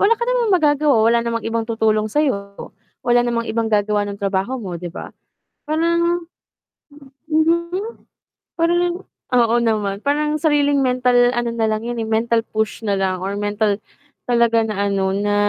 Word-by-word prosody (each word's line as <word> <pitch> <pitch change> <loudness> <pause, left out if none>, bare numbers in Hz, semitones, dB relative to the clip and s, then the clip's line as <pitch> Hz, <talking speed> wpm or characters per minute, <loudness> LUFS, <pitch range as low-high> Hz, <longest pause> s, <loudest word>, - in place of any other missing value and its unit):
wala 425 +3 +5
ka 475 - -2
namang 480 -4 +1
magagawa, 295 -3 +2
wala 235 +1 +4
namang 230 0 -3
ibang 225 0 -2
tutulong 215 -1 +1
sayo 210 -7 -2 0.3
wala 240 0 +4
namang 235 -1 -1
ibang 225 0 -1
gagawa 210 0 +1
ng 200 0 -6
trabaho 200 +5 -1
mo 190 -6 -6
'di 175 - -5
ba? - - -9 0.6
Parang, 340 +2 +1 1.1
mhm 340 +7 0 0.6
parang 345 +2 +1 0.3
oo 235 -1 +3
naman, 215 -4 0
parang 300 +1 +1
sariling 290 -2 +2
mental 250 -1 +3
ano 240 0 -1
nalang 220 -2 -1
yun 240 - -4
eh, 225 - -2
mental 225 +1 +1
push 220 0 -3
nalang 195 -2 0
or 190 +2 -3
mental, 205 0 0 0.5
talaga 235 -1 +3
na 215 -1 -3
ano 195 -1 0
na, 205 +1 0
235 Hz, 150 wpm, -20 LUFS, 215-300 Hz, 1.1 s, wala